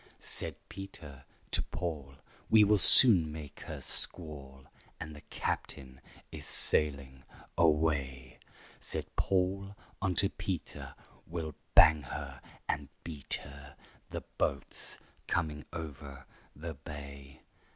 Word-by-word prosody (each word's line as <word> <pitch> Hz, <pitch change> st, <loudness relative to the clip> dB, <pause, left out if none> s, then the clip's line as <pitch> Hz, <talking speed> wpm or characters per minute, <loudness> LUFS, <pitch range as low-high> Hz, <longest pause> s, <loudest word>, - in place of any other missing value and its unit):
Said -, -, -2 dB
Peter 85 Hz, -7 st, -10 dB, 0.3 s
to -, -, 0 dB
Paul, 75 Hz, -6 st, -5 dB, 0.3 s
"We 110 Hz, -1 st, +7 dB
will 105 Hz, 0 st, +4 dB
soon 90 Hz, -8 st, +9 dB
make 75 Hz, -2 st, -9 dB
her -, -, -5 dB
squall, 70 Hz, -5 st, 0 dB, 0.4 s
And 80 Hz, -1 st, -7 dB
the 75 Hz, -, -11 dB
captain 65 Hz, -3 st, -4 dB, 0.3 s
is -, -, -8 dB
sailing 70 Hz, -3 st, +1 dB, 0.3 s
away." 70 Hz, -5 st, +1 dB, 0.4 s
Said -, -, -5 dB
Paul 95 Hz, +1 st, 0 dB, 0.3 s
unto 95 Hz, +1 st, +2 dB
Peter, 95 Hz, -3 st, -5 dB, 0.3 s
"We'll 80 Hz, -2 st, -4 dB, 0.2 s
bang 80 Hz, 0 st, +8 dB
her 65 Hz, -, -7 dB, 0.3 s
and 70 Hz, -1 st, -2 dB
beat 75 Hz, -5 st, -5 dB
her! 70 Hz, +1 st, -12 dB, 0.3 s
The -, -, -5 dB, 0.2 s
boat's 70 Hz, -, -1 dB, 0.3 s
coming 75 Hz, -3 st, -1 dB
over 70 Hz, -5 st, -8 dB, 0.3 s
the 80 Hz, +2 st, -6 dB
bay." 70 Hz, -1 st, -10 dB
75 Hz, 110 wpm, -32 LUFS, 70-85 Hz, 0.4 s, soon